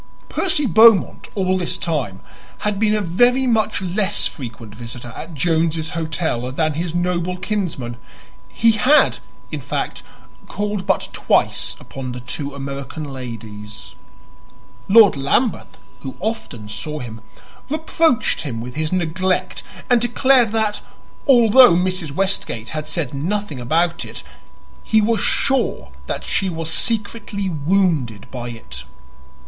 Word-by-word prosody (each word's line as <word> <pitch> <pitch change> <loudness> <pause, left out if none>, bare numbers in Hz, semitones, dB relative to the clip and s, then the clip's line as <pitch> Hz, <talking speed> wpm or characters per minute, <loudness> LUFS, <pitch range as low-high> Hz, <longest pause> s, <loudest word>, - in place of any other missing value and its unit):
Percy 320 -6 +2
Beaumont 220 -1 +5
all 185 -2 +1
this 175 - -2
time 130 - -2 0.4
had 210 -1 0
been 215 -1 +3
a 210 - 0
very 245 +9 +3
much 220 -5 +1
less 195 +2 -1
frequent 115 -5 -7
visitor 120 +1 -9
at 165 0 -8
Jones's 160 0 0
Hotel 160 -7 -2
than 155 +3 0
his 165 +2 -3
noble 180 0 0
kinsman; 180 - -3 0.5
he 230 0 +3
had, 255 +8 +4 0.3
in - - -4
fact, - - -3 0.5
called 205 -1 -3
but 190 - +1
twice - - +1
upon 130 -2 -7
the 125 - -6
two 140 +3 -5
American 140 +2 -5
ladies. 110 -4 -8 0.9
Lord 210 -2 +7
Lambeth, 145 - 0 0.2
who 135 - -8
often 125 - -4
saw 150 +8 -5
him, 115 -5 -7 0.5
reproached 315 -2 +1
him 125 -7 -4
with 125 +2 -6
his 155 +1 -2
neglect 185 +1 0 0.3
and 245 -2 +4
declared 245 -1 +4
that, 220 -2 0 0.5
although 245 -5 +7
Mrs. 180 -3 -1
Westgate 175 - -1
had 155 -1 -4
said 155 -5 -3
nothing 165 +1 -2
about 165 +7 +1
it, - - -8 0.6
he 220 - +3
was 220 0 +2
sure 245 - 0 0.2
that - - -3
she 195 - 0
was 165 -2 -4
secretly 205 -3 -1
wounded 155 - +1
by 120 -2 -5
it. 65 - -9
170 Hz, 130 wpm, -20 LUFS, 135-210 Hz, 0.9 s, Lord